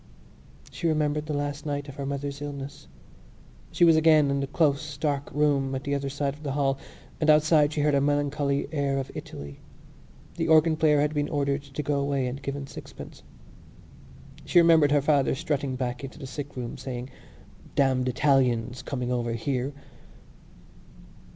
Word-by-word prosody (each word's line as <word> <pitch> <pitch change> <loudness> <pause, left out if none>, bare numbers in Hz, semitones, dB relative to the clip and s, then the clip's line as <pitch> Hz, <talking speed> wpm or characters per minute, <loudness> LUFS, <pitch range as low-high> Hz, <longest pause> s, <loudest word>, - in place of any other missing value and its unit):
She 170 - -2
remembered 150 -1 0
the 150 - -2
last 145 0 -3
night 145 -1 -3
of 140 - -8
her 140 0 -5
mother's 140 0 -4
illness; 145 0 -7 0.8
she 175 - +4
was 165 -1 +6
again 155 -3 +5
in 140 - 0
the 140 - -2
close 150 0 0
dark 145 -2 -1
room 140 -2 +1
at 130 - -4
the 140 - -2
other 140 -1 -1
side 140 0 -2
of 150 - -15
the 140 -3 -3
hall 135 -1 0 0.4
and 155 - +1
outside 150 -1 +5
she 150 - -1
heard 150 0 +2
a 140 - +3
melancholy 145 0 0
air 140 -3 0
of 135 -1 -4
Italy. 70 0 -8 0.8
The 165 -1 -1
organ 160 0 +5
player 155 -2 +3
had 150 +1 0
been 145 -1 -1
ordered 140 -1 0
to 140 +1 -6
go 145 0 0
away 140 -1 0
and 130 +3 -4
given 140 0 -4
sixpence. - - -11 1.2
She - - 0
remembered 165 -3 +6
her 145 -2 +3
father 145 -3 +2
strutting 145 -3 -2
back 125 -1 -3
into 135 +1 -8
the 145 - -8
sickroom 135 -3 -6
saying: 125 0 -6 0.6
"Damned 130 -2 +2
Italians! 125 -3 +1
coming 125 -2 -3
over 120 -2 -1
here!" 130 +3 -2
140 Hz, 170 wpm, -26 LUFS, 135-150 Hz, 1.2 s, was